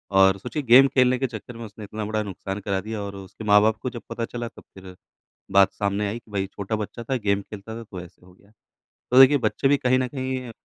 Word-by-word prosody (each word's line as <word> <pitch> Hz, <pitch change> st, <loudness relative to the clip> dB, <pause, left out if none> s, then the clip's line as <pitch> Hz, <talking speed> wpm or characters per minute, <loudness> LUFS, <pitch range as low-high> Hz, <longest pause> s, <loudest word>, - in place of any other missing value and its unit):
और 95 Hz, 0 st, +6 dB
सोचिए 125 Hz, +8 st, -4 dB
गेम 130 Hz, +3 st, +7 dB
खेलने 130 Hz, -1 st, +3 dB
के 135 Hz, -, 0 dB
चक्कर 115 Hz, +1 st, -9 dB
में 115 Hz, -, -7 dB
उसने 105 Hz, 0 st, -11 dB
इतना 105 Hz, +1 st, -6 dB
बड़ा 110 Hz, 0 st, -1 dB
नुकसान 95 Hz, 0 st, -6 dB
करा 100 Hz, -1 st, -2 dB
दिया 110 Hz, 0 st, -5 dB
और 100 Hz, -1 st, -6 dB
उसके 95 Hz, +3 st, -10 dB
माँ-बाप 105 Hz, +1 st, +4 dB
को 125 Hz, -, -2 dB
जब 120 Hz, -2 st, -8 dB
पता 115 Hz, 0 st, -3 dB
चला, 120 Hz, 0 st, -5 dB
तब -, -, -14 dB
फिर 95 Hz, -1 st, -12 dB, 0.6 s
बात 100 Hz, 0 st, +5 dB
सामने 100 Hz, 0 st, -1 dB
आई 115 Hz, +4 st, -4 dB
कि 115 Hz, -, -22 dB
भाई 100 Hz, -1 st, -2 dB
छोटा 100 Hz, +2 st, -4 dB
बच्चा 110 Hz, +3 st, -6 dB
था 130 Hz, -, +2 dB
गेम 100 Hz, 0 st, +2 dB
खेलता 105 Hz, +2 st, -9 dB
था, 115 Hz, -, -7 dB
तो 95 Hz, -4 st, -9 dB
ऐसे 90 Hz, 0 st, -14 dB
हो 90 Hz, -, -17 dB
गया। 100 Hz, +2 st, -25 dB, 0.6 s
तो 125 Hz, -, +5 dB
देखिए 140 Hz, +2 st, +8 dB
बच्चे 135 Hz, -, 0 dB
भी 145 Hz, -, +4 dB
कहीं 130 Hz, -2 st, +2 dB
न 130 Hz, -1 st, -1 dB
कहीं 130 Hz, -2 st, -4 dB
110 Hz, 250 wpm, -24 LUFS, 100-125 Hz, 0.6 s, देखिए